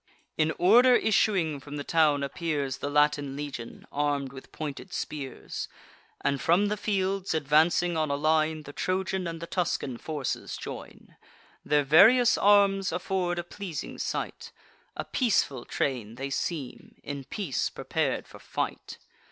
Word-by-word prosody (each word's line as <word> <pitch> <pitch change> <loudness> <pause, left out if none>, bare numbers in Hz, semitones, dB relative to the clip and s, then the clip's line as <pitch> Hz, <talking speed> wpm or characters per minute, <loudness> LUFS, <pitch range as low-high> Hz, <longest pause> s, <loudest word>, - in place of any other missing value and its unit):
In 155 0 +2
order 245 +7 +6
issuing 190 -10 +2
from 145 +2 -9
the 145 - -4
town 150 -3 +3
appears 140 -3 -2
The 145 - -3
Latin 145 -1 +2
legion, 140 -5 -7
arm'd 140 -2 -1
with 130 - -11
pointed 150 -3 -6
spears; 140 -3 -5 0.5
And 140 -1 0
from 190 +5 +3
the 210 - 0
fields, 195 -3 -1
advancing 160 +3 +3
on 155 -1 0
a 140 - +1
line, 155 +1 +1
The 145 - -10
Trojan 185 +1 -1
and 165 -1 -5
the 170 - -5
Tuscan 155 -8 -2
forces 150 -4 -4
join: - - -9 0.5
Their 150 0 +2
various 225 - +6
arms 200 -1 +4
afford 180 0 -1
a 175 - -2
pleasing 175 -3 -6
sight; - - -4 0.5
A - - -3
peaceful 145 - +1
train 115 -5 -2
they 135 +2 -5
seem, 140 -1 -4
in 140 -1 -6
peace 180 - -2
prepar'd - - -2
for - - -13
fight. - - -4
155 Hz, 145 wpm, -28 LUFS, 140-185 Hz, 0.5 s, order